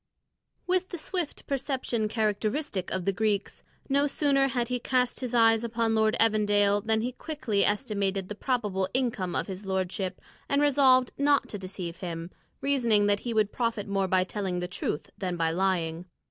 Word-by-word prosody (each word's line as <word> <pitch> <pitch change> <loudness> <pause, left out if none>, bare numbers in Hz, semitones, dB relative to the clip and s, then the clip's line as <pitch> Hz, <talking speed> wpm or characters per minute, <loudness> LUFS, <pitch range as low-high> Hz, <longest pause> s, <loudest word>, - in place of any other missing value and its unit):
With 370 0 +1
the 350 - -5
swift 340 -1 -4
perception 260 -5 -1
characteristic 215 - -1
of 185 -2 -3
the 195 - +3
Greeks, 205 0 -1 0.2
no 280 +1 +2
sooner 275 -1 +2
had 245 -2 -1
he 250 0 -1
cast 250 0 0
his 250 -2 -3
eyes 225 -1 +5
upon 230 -1 0
Lord 220 +1 +2
Evandale 205 -2 +3
than 220 0 +1
he 245 +3 -2
quickly 255 -8 -1
estimated 200 -3 0
the 210 - -5
probable 210 -5 -1
income 225 -9 0
of - - 0
his 195 0 -7
lordship 190 0 -2 0.3
and 280 - +2
resolved 265 -3 +4
not 285 0 +3
to 205 - -5
deceive 185 -2 -6
him, 170 -1 -5 0.3
reasoning 240 -7 +3
that 205 0 +3
he 240 - -4
would 210 -1 +2
profit 230 -4 -1
more 195 -1 0
by 185 0 +3
telling 190 -1 -3
the 180 - -3
truth 175 -4 -4
than 180 -2 -2
by 165 -1 +1
lying. 170 -2 0
215 Hz, 175 wpm, -28 LUFS, 190-255 Hz, 0.3 s, eyes